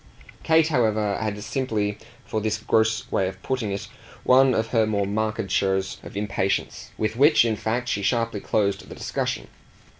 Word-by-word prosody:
Kate, 160 Hz, 0 st, +4 dB
however, 110 Hz, -7 st, +1 dB
had 105 Hz, -2 st, -3 dB
simply, 105 Hz, -4 st, -2 dB, 0.3 s
for 110 Hz, -, -2 dB
this 110 Hz, 0 st, 0 dB
gross 110 Hz, 0 st, +1 dB
way 95 Hz, -, +1 dB
of 95 Hz, 0 st, -7 dB
putting 125 Hz, -6 st, -2 dB
it, 100 Hz, -, -4 dB, 0.4 s
one 130 Hz, 0 st, +5 dB
of 110 Hz, 0 st, 0 dB
her 110 Hz, -3 st, +2 dB
more 100 Hz, -2 st, 0 dB
marked 110 Hz, -1 st, -2 dB
shows 95 Hz, -1 st, 0 dB
of -, -, -9 dB
impatience; 100 Hz, -2 st, -2 dB
with 110 Hz, +1 st, -1 dB
which 145 Hz, +1 st, +5 dB
in 115 Hz, -2 st, +1 dB
fact 115 Hz, +4 st, -2 dB
she 100 Hz, -, -1 dB
sharply 115 Hz, 0 st, 0 dB
closed 100 Hz, -1 st, -1 dB
their -, -, -9 dB
discussion. -, -, -3 dB
110 Hz, 170 wpm, -24 LUFS, 100-115 Hz, 0.4 s, one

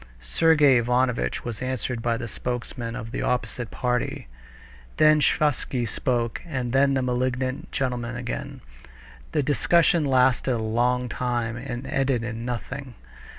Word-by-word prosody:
Sergey 145 Hz, -, +4 dB
Ivanovitch 125 Hz, -, 0 dB
was 120 Hz, -2 st, -5 dB
answered 130 Hz, -2 st, -2 dB
by 115 Hz, 0 st, 0 dB
the 120 Hz, -, -5 dB
spokesman 120 Hz, 0 st, -4 dB
of 115 Hz, 0 st, -6 dB
the -, -, -3 dB
opposite 125 Hz, -1 st, -1 dB
party. 125 Hz, -, -2 dB, 0.7 s
Then 155 Hz, 0 st, +6 dB
Sviazhsky 135 Hz, -5 st, +1 dB
spoke, 120 Hz, 0 st, -1 dB
and 130 Hz, -7 st, -3 dB
then 135 Hz, +1 st, +4 dB
the 130 Hz, -, +1 dB
malignant 130 Hz, +1 st, -1 dB
gentleman 125 Hz, -3 st, -2 dB
again. 120 Hz, 0 st, -5 dB, 0.7 s
The -, -, +1 dB
discussion 165 Hz, +4 st, +3 dB
lasted 130 Hz, -1 st, +3 dB
a -, -, 0 dB
long 120 Hz, +3 st, +1 dB
time 120 Hz, -2 st, -2 dB
and 120 Hz, 0 st, -6 dB
ended 135 Hz, -3 st, 0 dB
in 115 Hz, -1 st, -4 dB
nothing. 125 Hz, +2 st, -5 dB
125 Hz, 135 wpm, -25 LUFS, 120-130 Hz, 0.7 s, Then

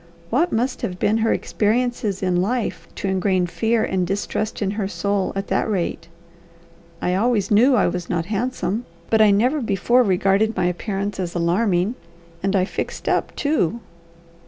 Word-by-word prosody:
What 325 Hz, +9 st, +2 dB
must 250 Hz, +3 st, -1 dB
have 180 Hz, -, -3 dB
been 215 Hz, +4 st, +1 dB
her 225 Hz, 0 st, +2 dB
experiences 220 Hz, -3 st, 0 dB
in 180 Hz, -1 st, +1 dB
life 205 Hz, -5 st, -2 dB
to -, -, -3 dB
ingrain 190 Hz, -1 st, +1 dB
fear 225 Hz, +5 st, 0 dB
and 185 Hz, -2 st, -1 dB
distrust 205 Hz, +3 st, -2 dB
in 195 Hz, -2 st, 0 dB
her 205 Hz, -1 st, -2 dB
soul 200 Hz, -1 st, -1 dB
at 195 Hz, 0 st, -2 dB
that -, -, +1 dB
rate? 185 Hz, -6 st, -2 dB, 1.0 s
I 180 Hz, -, +1 dB
always 210 Hz, 0 st, +1 dB
knew 245 Hz, +6 st, +5 dB
I -, -, +3 dB
was 180 Hz, -1 st, -2 dB
not 165 Hz, -2 st, -1 dB
handsome, 225 Hz, +1 st, -2 dB, 0.2 s
but 220 Hz, -1 st, +4 dB
I 215 Hz, -, +7 dB
never 245 Hz, +9 st, +2 dB
before 235 Hz, +3 st, +2 dB
regarded 195 Hz, +1 st, +2 dB
my 180 Hz, -, +1 dB
appearance 195 Hz, +3 st, -2 dB
as 180 Hz, -2 st, -3 dB
alarming. 180 Hz, +3 st, +1 dB, 0.5 s
And 195 Hz, +1 st, 0 dB
I 185 Hz, -1 st, +3 dB
'fixed -, -, -5 dB
up,' -, -, 0 dB
too!" 260 Hz, -, 0 dB
200 Hz, 165 wpm, -22 LUFS, 185-225 Hz, 1.0 s, I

